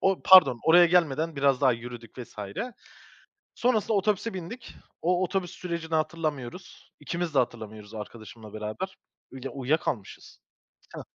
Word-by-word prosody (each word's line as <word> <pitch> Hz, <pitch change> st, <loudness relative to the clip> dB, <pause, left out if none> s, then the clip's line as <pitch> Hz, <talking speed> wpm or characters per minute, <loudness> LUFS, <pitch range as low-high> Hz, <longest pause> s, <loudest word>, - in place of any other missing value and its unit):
O, 195 Hz, -1 st, +1 dB
pardon, 185 Hz, -11 st, +8 dB
oraya 175 Hz, +2 st, +7 dB
gelmeden 165 Hz, -2 st, +2 dB
biraz 140 Hz, -2 st, +3 dB
daha 135 Hz, -3 st, +5 dB
yürüdük 120 Hz, 0 st, -9 dB
vs. 125 Hz, -, -9 dB, 1.2 s
Sonrasında 225 Hz, -3 st, +1 dB
otobüse 210 Hz, +2 st, +1 dB
bindik. 195 Hz, +7 st, -8 dB, 0.3 s
O, 180 Hz, +2 st, +2 dB
otobüs 185 Hz, -1 st, -1 dB
sürecini 170 Hz, -3 st, -4 dB
hatırlamıyoruz. 155 Hz, 0 st, -4 dB
İkimiz 170 Hz, -2 st, -3 dB
de -, -, +6 dB
hatırlamıyoruz, 110 Hz, -4 st, -4 dB
arkadaşımla 110 Hz, 0 st, -9 dB
beraber. 110 Hz, -, -5 dB, 0.3 s
Uyuya 135 Hz, 0 st, -7 dB
uyuyakalmışız. 135 Hz, -6 st, -3 dB, 0.6 s
Heh, -, -, -6 dB
155 Hz, 125 wpm, -27 LUFS, 120-180 Hz, 1.2 s, pardon